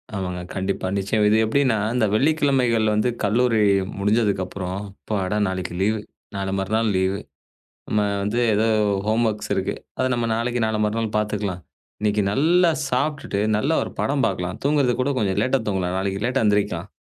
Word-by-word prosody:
ஆமாங்க. 90 -2 -3
கண்டிப்பா, 95 0 -2
நிச்சயமா. 105 +2 +1
இது 110 - +4
எப்படின்னா 125 0 +2 0.2
இந்த 120 -3 +3
வெள்ளிக்கிழமைகள் 130 -3 +2
வந்து 110 +4 +2
கல்லூரி 115 +2 +2 0.4
முடிஞ்சதுக்கு 105 -1 +1
அப்புறம், 90 0 -5
"அப்பாடா! 100 0 -3
நாளைக்கு 95 -2 -4
லீவு. 110 +2 +1 0.4
நாளை 95 -1 -2
மறுநாள் 110 +3 0
லீவு. 95 +1 +1 0.7
நம்ம 105 - +1 0.2
வந்து 105 +4 -1 0.2
ஏதோ 110 +2 +2 0.4
ஹோம்வொர்க்ஸ் 110 -1 0
இருக்கு. - - -1 0.2
அதை 130 - +1
நம்ம 120 -1 -1
நாளைக்கு, 120 +1 -1
நாளை 110 0 -1
மறுநாள் 110 0 -2
பாத்துக்கலாம். 105 -4 -2 0.4
இன்னைக்கு 105 0 +1
நல்லா 170 - +4 0.2
சாப்பிட்டுட்டு 140 -5 -1 0.2
நல்ல 135 +8 0
ஒரு - - -4
படம் 140 -2 +1
பார்க்கலாம். 90 -3 -2
தூங்குறது 140 -3 +2
கூடக் 135 +1 0
கொஞ்சம் 95 -4 0
லேட்டா 130 +1 +1
தூங்கலாம். 95 -2 -1
நாளைக்கு 95 +1 -2
லேட்டா 125 0 +1
எந்திரிக்கலாம்." 100 -3 0
105 Hz, 150 wpm, -22 LUFS, 100-125 Hz, 0.7 s, இது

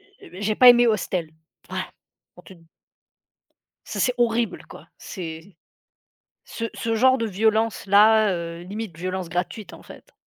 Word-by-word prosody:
heu, 405 0 -19
je 185 - -9
j'ai 210 +1 0
pas 250 - +8
aimé 240 0 +7
Hostel, 185 -7 -1 0.4
ouais - - -3 0.5
pour - - -17
te 190 - -14
d 170 - -21 1.2
Ça, - - -5
c'est 250 -1 +1
horrible 235 -1 0
quoi, - - -14
c'est 165 -1 -9 0.9
ce 230 - -7
ce 225 0 -2
genre 260 +3 +4
de 230 - -2
violence-là, 215 0 +3
heu, 170 -1 -6
limite 200 -1 -7
violence 185 0 -4
gratuite 180 +4 -4
en - - -14
fait. - - -16
210 Hz, 150 wpm, -23 LUFS, 180-230 Hz, 1.2 s, pas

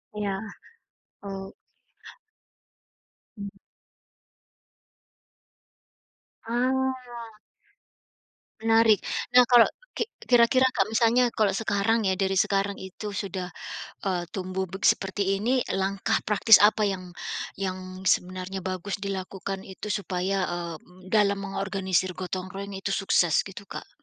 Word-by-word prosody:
Iya, 200 -2 -2 0.8
oh. 195 -1 -7 1.8
Mmm. 200 0 -5 3.0
Ah. 260 +3 +1 1.7
Menarik. 225 -1 +5 0.4
Nah, 250 - +9
kalau 240 -1 +6 0.2
ki 455 - -1 0.2
kira-kira 245 +2 +5
kalau 205 -3 +1
misalnya, 240 +2 +4
kalau 205 -3 +2
sekarang 210 +1 +1
ya, - - +2
dari 195 -1 +1
sekarang 200 +1 +1
itu 200 +2 -7
sudah, 190 -3 -4 0.6
eee, 180 -2 0
tumbuh 190 0 -3
beg 190 +1 -4
seperti 195 0 +2
ini, 250 +3 +2
langkah 195 +3 0
praktis 215 +1 +6
apa 210 0 +5
yang 185 -2 -3 0.5
yang 190 -1 -2 0.3
sebenarnya 185 +1 0
bagus 185 +2 -3
dilakukan 195 0 -4
itu 195 +2 -8
supaya, 195 -1 -1
eee, 175 -1 -4
m - - -23 0.2
m - - -11
dalam 205 -2 +3
mengorganisir 190 -2 -1
gotong 185 0 -4
royong 195 0 -6
itu 195 0 -2
sukses, 175 -4 +3
gitu, 200 +1 -10
Kak? - - -8
195 Hz, 110 wpm, -26 LUFS, 190-215 Hz, 3.0 s, Nah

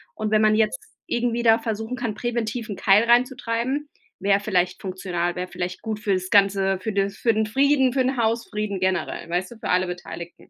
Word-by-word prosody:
und 215 -1 -3
wenn 215 0 +4
man 215 0 +4
jetzt 215 -1 +1 0.3
irgendwie 240 0 -1
da 225 -1 +6
versuchen 225 +2 -4
kann, 235 -4 -3
präventiv 235 -1 -3
'n 200 - -5
Keil 195 +4 +5
reinzutreiben, 250 +3 +1 0.3
wäre 195 +1 +3
vielleicht 185 -3 0
funktional, 180 -2 -3
wäre 180 0 -4
vielleicht 180 0 -5
gut 220 -2 -4
fürs 185 -3 -1
Ganze, 195 -1 +3
für 220 +2 -3
den 200 0 +1
für 225 +3 +1
den 215 0 0
Frieden, 270 +2 +3
für 270 - 0
den 260 +2 0
Hausfrieden 215 -3 -1
generell, 185 -2 -2
weißt 180 +3 -2
du, 235 - -11
für - - -5
alle 180 0 +2
Beteiligten. 175 -1 -8
215 Hz, 195 wpm, -23 LUFS, 185-235 Hz, 0.3 s, da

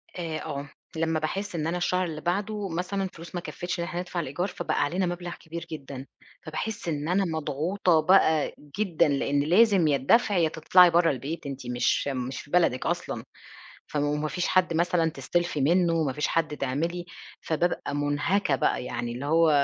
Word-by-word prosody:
آآ 165 -3 -3
آه، 140 +1 -5 0.3
لمّا 160 0 0
باحس 195 +5 -3
إن 155 -1 -1
أنا 170 +2 -1
الشهر 180 +1 +1
اللي 155 -3 -5
بعده 200 +3 -2
مثلًا 180 +4 -2
الفلوس 175 -2 -8
ما 175 - -2
كفّيتش 180 0 -5
إن - - 0
إحنا 175 0 -4
ندفع 180 -1 -4
الإيجار، 170 +4 -2
فبقى - - -1
علينا 180 +5 0
مبلغ 175 0 -4
كبير 165 +1 -8
جدًا، 140 -3 -7 0.4
فباحس 215 +6 -5
إن 150 -1 -2
أنا 190 +2 +2
مضغوطة 160 +2 +1
بقى 160 -3 +4 0.3
جدًا، 185 -8 +2
لإن 140 0 +1
لازم 185 +1 +4
يا 145 - +3
الدفع 205 - +3
يا 165 -2 +3
تطلعي 175 +3 +6
برّا 170 0 +4
البيت، 145 +5 -5
أنتِ 135 -2 -6
مش 125 +3 +1
مش 130 -1 -3
في 145 - -17
بلدِك 170 -8 +2
أصلًا. - - -2 0.6
فما 145 -1 -1
وما 150 +1 -1
فيش 175 +5 -2
حد 185 -2 +2
مثلًا 170 0 +2
تستلفي 155 +2 -1
منّه، 165 +2 +3
ما 135 -3 -1
فيش 150 +2 -1
حد 155 -3 0
تعملي 165 +7 -2 0.4
فبابقى 160 -3 -1
مُنهَكَة 145 +3 +1
بقى، 125 - 0
يعني 120 -1 -3
اللي 125 +4 -5
هو 165 +2 +4
165 Hz, 180 wpm, -27 LUFS, 145-180 Hz, 0.6 s, تطلعي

